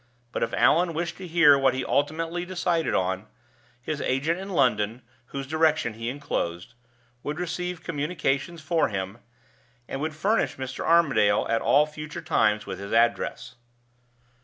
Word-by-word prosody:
But - - -3
if 115 - 0
Allan 170 +1 +3
wished 170 +1 -3
to 185 - -8
hear 165 -4 +6
what 135 -2 +3
he 130 - -2
ultimately 165 +4 -1
decided 175 -2 0
on, 95 0 -1 0.5
his 145 +4 -4
agent 145 +7 0
in 195 +1 -7
London 120 - +1 0.2
(whose 135 -1 -5
direction 155 -4 +1
he 115 +2 -4
inclosed) 115 -8 -3 0.5
would 150 +5 -4
receive 180 0 -4
communications 155 0 -2
for 165 0 +2
him, 95 +2 -4 0.7
and 135 - -5
would 155 0 -3
furnish 200 +8 +1
Mr. 130 -1 -5
Armadale 140 -12 +4
at 115 0 +1
all 145 +2 +4
future 150 +1 -7
times 105 -10 +2
with - - -6
his 100 0 -7
address. 115 +1 +1
150 Hz, 150 wpm, -26 LUFS, 120-165 Hz, 0.7 s, hear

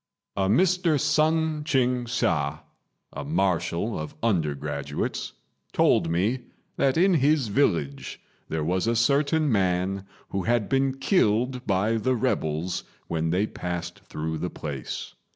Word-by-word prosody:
A 95 -1 +1
Mr. 175 - +3
Sun 155 +1 +2
Ching 125 -4 +1
hsia, 80 - 0 0.5
a - - -5
marshal 95 +2 0
of 75 0 -6
undergraduates, 75 -7 -1 0.4
told - - +3
me 100 +10 +1 0.4
that 135 +2 +2
in 185 +3 +5
his 145 -5 +3
village 85 - 0 0.3
there 80 -1 -1
was 90 +6 0
a 115 - +2
certain 145 +5 +2
man 95 -1 0 0.2
who 100 - -2
had 120 -3 +2
been 135 0 +1
killed 125 - +1
by 105 +3 +2
the 130 +4 +1
rebels 90 -8 -1 0.3
when 80 -1 0
they 90 +5 +2
passed 90 -4 -5
through 80 +1 -4
the 90 - -2
place. 70 -6 -6
105 Hz, 130 wpm, -26 LUFS, 85-135 Hz, 0.5 s, in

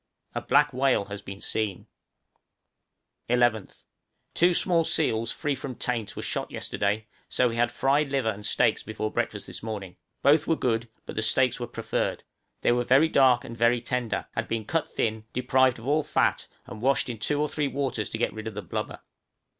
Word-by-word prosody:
A - - -2
black - - +3
whale 130 -5 +2
has 100 0 -7
been 100 0 -8
seen. 105 -4 -2 1.4
{SEAL 125 - +3
STEAKS.} 120 -1 +5
11th. 110 -3 -11 0.5
Two 175 +1 +4
small 170 -2 +3
seals 115 -9 +1
free 150 -2 -1
from 130 -1 -6
taint 115 -5 -2
were - - -5
shot - - -2
yesterday, 105 +2 -2 0.2
so 125 -1 +2
we 115 - -4
had 120 0 +2
fried 140 +1 +1
liver 130 -5 +1
and 105 0 -9
steaks - - +2
for 110 0 -4
breakfast - - -2
this - - -7
morning; 105 -5 -6 0.3
both 150 +2 +5
were 165 - +3
good, 115 -4 -1 0.2
but - - -7
the 110 - 0
steaks 125 +2 +2
were 120 - -3
preferred; - - -2 0.4
they - - +3
were 120 0 +2
very 135 +6 +5
dark 130 -5 +5
and 115 - -7
very 115 +1 +3
tender, 125 -1 -2
had - - -3
been 115 -2 -2
cut 165 +8 -1
thin, 110 -1 -2
deprived 130 0 +3
of 115 +2 -9
all 150 +2 +3
fat, 150 - +1 0.2
and 105 +2 -9
washed 135 +2 +2
in 120 -3 -5
two 145 +6 0
or 150 - +2
three 150 -1 -1
waters 135 -6 -2
to - - -3
get 120 - 0
rid 110 0 -6
of 110 - -6
the 105 - -5
blubber. - - -4
120 Hz, 200 wpm, -27 LUFS, 110-135 Hz, 1.4 s, STEAKS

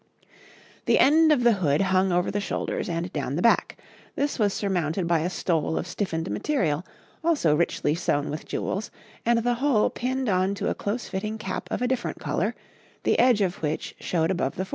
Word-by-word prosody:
The - - +4
end 315 +3 +5
of 270 -5 +3
the 240 - +6
hood 145 -1 +2
hung 190 0 +2
over 175 +1 +1
the 205 - -1
shoulders 200 - -3
and 170 +1 -3
down 140 -2 -2
the 170 - -1
back; 230 - +3 0.4
this 285 -1 -1
was 205 -2 +3
surmounted 180 -3 -1
by 170 -1 +2
a 165 +3 -1
stole 165 -3 -1
of - - -2
stiffened 175 -2 -3
material, 175 - 0 0.4
also 290 - +3
richly 150 -2 +1
sewn 150 -3 -1
with 155 - -6
jewels, 200 +4 -3 0.4
and 235 -1 +3
the 245 0 +2
whole 270 -7 +3
pinned 260 +1 -2
on 190 0 +1
to - - -2
a - - +1
close 220 +4 -3
fitting 210 +3 -3
cap 220 - -5
of - - -2
a - - +2
different 255 -1 -2
colour, - - -1 0.5
the - - +2
edge 245 -4 +5
of 185 -3 -1
which 155 0 -2
showed 165 0 0
above 155 -7 -1
the 185 - -2
forehead. - - -19
190 Hz, 200 wpm, -25 LUFS, 165-235 Hz, 0.5 s, the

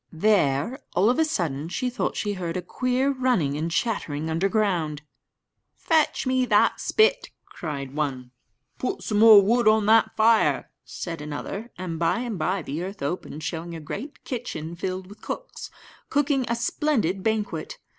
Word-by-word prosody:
There, 180 - +2 0.2
all 195 +7 +4
of 255 - -1
a - - +5
sudden, 165 - -2
she 255 - -2
thought 245 - -2
she 205 -1 -1
heard 175 -3 -3
a 180 - -4
queer 255 +7 0
running 250 - +1
about 145 - -3
and 165 - -1
chattering 160 -7 -1
underground. 175 -5 0 0.7
"Fetch 315 -4 +1
me 260 0 +2
that - - +3
spit," 460 +3 +2 0.2
cried 140 -5 -6
one; 135 -4 -3 0.5
"Put 255 - -3
some 210 -1 0
more 215 -2 +9
wood 235 +3 +2
on 215 -1 +5
that 220 +1 +4
fire," 225 +1 +3
said 165 -3 -6
another; 155 +9 -5
and 175 -3 -5
by 170 +8 +1
and 230 -7 -4
by 180 +3 0
the 150 +4 -4
earth 190 -2 -6
opened, 155 0 -4
showing 170 0 -4
a - - -6
great 215 - -7
kitchen 170 - -5
filled 185 +1 -4
with 205 +3 -14
cooks, - - -6 0.4
cooking 285 -2 +1
a 235 - +1
splendid 235 - 0
banquet. 210 -6 -2
195 Hz, 165 wpm, -25 LUFS, 160-235 Hz, 0.7 s, more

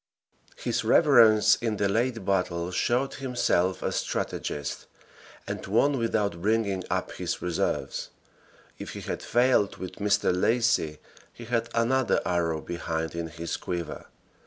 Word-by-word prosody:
His - - -2
reverence 110 -8 +6
in 115 -3 -2
the 100 - +1
late 115 +1 0
battle 90 -3 0
showed 125 +8 0
himself 120 -8 0
a - - 0
strategist, 75 - -3 0.6
and - - -5
won 130 +7 +2
without 105 -6 -1
bringing 100 -2 +1
up - - -1
his - - -3
reserves; 90 -2 -2 0.7
if - - -7
he - - -7
had - - -4
failed 120 -4 +2
with 95 - -7
Mr. 100 -3 +2
Lacy 115 -6 +1 0.3
he 120 - -11
had 115 0 -1
another 120 +2 +2
arrow 80 -3 0
behind 80 -1 -3
in 85 0 -3
his 85 +1 -5
quiver. 85 -3 -5
105 Hz, 135 wpm, -27 LUFS, 85-120 Hz, 0.7 s, reverence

